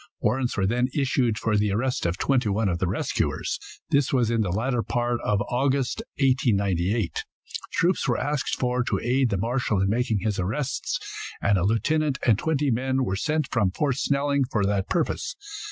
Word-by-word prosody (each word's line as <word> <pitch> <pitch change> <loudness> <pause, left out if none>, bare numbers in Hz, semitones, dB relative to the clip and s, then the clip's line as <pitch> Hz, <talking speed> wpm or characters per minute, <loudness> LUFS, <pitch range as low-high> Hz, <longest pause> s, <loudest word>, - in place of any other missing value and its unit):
Warrants 125 -1 0
were 95 - +2
then 120 +5 +1
issued 130 -5 +1
for 115 -3 0
the 105 -1 +2
arrest 125 +1 0
of 85 +2 -2
twenty 130 -3 +1
one 105 +2 +1
of 85 -2 -1
the 95 - 0
rescuers. 90 - -1 0.3
This 140 -2 +3
was 120 -4 +2
in 115 -1 +2
the 100 - 0
latter 115 +6 0
part 120 +1 -1
of 105 -1 +1
August, 135 +1 0 0.2
1898. 105 - +1 0.5
Troops 180 +3 +1
were - - +2
asked 145 -1 -1
for 125 0 +1
to - - -1
aid 125 +1 +1
the 100 - 0
marshal 115 0 0
in 95 +1 +2
making 110 -2 0
his 105 -1 -1
arrests, 110 +10 -1 0.4
and 100 -1 +2
a - - 0
lieutenant 140 +7 +1
and 115 -4 +4
twenty 150 -2 +1
men 130 +3 0
were 95 - -1
sent 155 +6 0
from 100 -6 +2
Fort 135 +7 0
Snelling 140 0 +1
for 100 -3 +1
that 100 -1 0
purpose. 175 - -1
120 Hz, 185 wpm, -25 LUFS, 100-135 Hz, 0.5 s, and